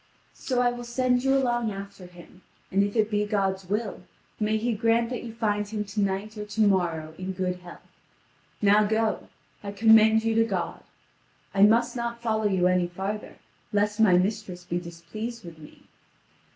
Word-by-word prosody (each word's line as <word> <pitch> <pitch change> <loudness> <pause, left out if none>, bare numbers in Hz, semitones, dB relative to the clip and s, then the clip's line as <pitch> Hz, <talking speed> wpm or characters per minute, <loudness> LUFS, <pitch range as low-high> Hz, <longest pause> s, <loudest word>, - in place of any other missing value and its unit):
So 250 -2 -1
I 245 0 +3
will 245 0 -7
send 250 +1 +1
you 270 0 +3
along 240 -4 0
after 195 -2 -9
him, 180 +1 -16 0.3
and 195 - +3
if 200 +2 -1
it 220 -1 +2
be 210 0 +1
God's 195 -3 -1
will, 210 -2 -2 0.4
may 215 0 +1
He 230 +2 -1
grant 230 +2 +1
that 250 - -3
you 235 - -6
find 210 -2 -1
him 210 0 -3
to 205 +1 -3
night 200 +2 -2
or 210 - -4
to 215 +1 -2
morrow 170 -6 +1
in 185 +1 -4
good 180 -1 -2
health. 180 -1 -13 0.8
Now 205 +1 +5
go: 220 +1 0 0.4
I 200 - -5
commend 220 +1 +5
you 225 0 +1
to 225 0 +4
God. 190 -6 -3 0.7
I 195 - +1
must 225 +5 +5
not 235 -1 -3
follow 220 -2 -1
you 190 -3 +1
any 180 -1 +3
farther, 195 +4 -5 0.4
lest 210 +1 0
my 195 -5 +6
mistress 190 -1 -2
be 175 0 -2
displeased 180 +7 -7
with 165 -2 -11
me." 150 - -15
210 Hz, 180 wpm, -26 LUFS, 190-225 Hz, 0.8 s, my